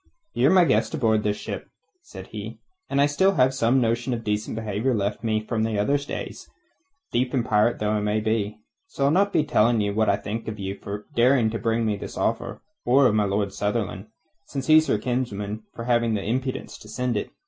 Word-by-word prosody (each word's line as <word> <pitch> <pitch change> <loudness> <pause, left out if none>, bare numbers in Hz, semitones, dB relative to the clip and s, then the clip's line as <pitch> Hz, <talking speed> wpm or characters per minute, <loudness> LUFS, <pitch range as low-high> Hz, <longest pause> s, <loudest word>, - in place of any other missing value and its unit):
"Ye're 125 +4 +3
my 185 0 +6
guest 165 - +1
aboard 110 -7 +2
this 105 0 -1
ship," - - -6 0.3
said - - -11
he, - - -7 0.3
"and 140 - 0
I 140 - +6
still 190 +7 +2
have 130 -5 +3
some 130 0 +2
notion 120 +1 0
of 115 - -7
decent 105 +1 -2
behaviour 110 +3 -1
left 105 +2 -2
me 110 -1 0
from 110 -2 -1
other 110 +5 +1
days, 145 - -7 0.6
thief 125 +2 0
and 120 -2 +1
pirate 105 +2 +2
though 105 0 -1
I 105 - +1
may 105 +1 0
be. 110 -1 -1 0.3
So 140 - -2
I'll 140 - +4
not 200 +5 +3
be 155 - +2
telling 115 -4 +3
you 105 -1 0
what 110 +1 +2
I - - +4
think 110 +2 -5
of 110 -1 -4
you 95 -1 -4
for 100 +1 -7
daring 120 -2 +4
to 115 - -3
bring 115 0 0
me 105 -2 0
this - - -8
offer, - - -2 0.2
or 130 +3 +4
of 115 - +4
my 105 -1 +2
Lord 100 0 -1
Sunderland 105 -1 -2 0.4
since 135 -2 -4
he's 155 +1 +5
your - - +3
kinsman 110 -3 -3
for 115 - -6
having 120 -2 +2
the 100 - -2
impudence 130 +4 -3
to - - -13
send 125 -2 -2
it. 105 - -2
115 Hz, 215 wpm, -24 LUFS, 105-130 Hz, 0.6 s, my